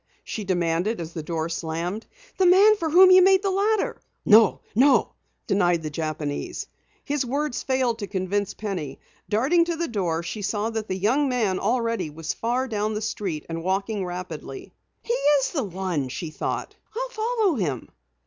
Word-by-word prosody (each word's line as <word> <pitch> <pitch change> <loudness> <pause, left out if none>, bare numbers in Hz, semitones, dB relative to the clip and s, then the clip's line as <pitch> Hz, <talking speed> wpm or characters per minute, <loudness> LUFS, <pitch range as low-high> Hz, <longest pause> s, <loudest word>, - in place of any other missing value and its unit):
she 215 - -5
demanded 175 +2 0
as 165 0 -6
the 160 - -4
door 160 0 -3
slammed. 170 +5 -4 0.3
"The 375 - +5
man 400 +4 +7
for 330 -6 -2
whom 370 +4 +7
you 370 0 +8
made 380 +1 +5
the 390 - +1
ladder?" 410 +2 0 0.2
"No, 215 -1 +6
no!" 265 +6 +4 0.3
denied 175 -4 +2
the 155 - -4
Japanese. 155 -1 -4 0.4
His 285 -1 0
words 280 +2 -2
failed 255 -3 0
to 205 - -4
convince 195 +1 -2
Penny. 180 -10 -5 0.3
Darting 270 +12 +3
to 340 -1 -2
the 335 +1 -2
door, 175 -7 -1
she 210 +5 -5
saw 210 +2 -1
that 220 -1 -4
the 185 - -2
young 255 +9 +2
man 220 -7 0
already 230 -5 0
was 155 +1 -4
far 245 +3 -1
down 215 -2 -2
the - - -1
street, 195 -7 -3
walking 190 +5 -2
rapidly. 175 -6 -7 0.3
"He 475 - -1
is 290 - +2
the 280 -8 -1
one," 180 -7 -3
she 155 +5 -5
thought. - - -4 0.2
"I'll - - -2
follow 440 -6 0
him." 145 - -2
210 Hz, 170 wpm, -24 LUFS, 175-280 Hz, 0.4 s, you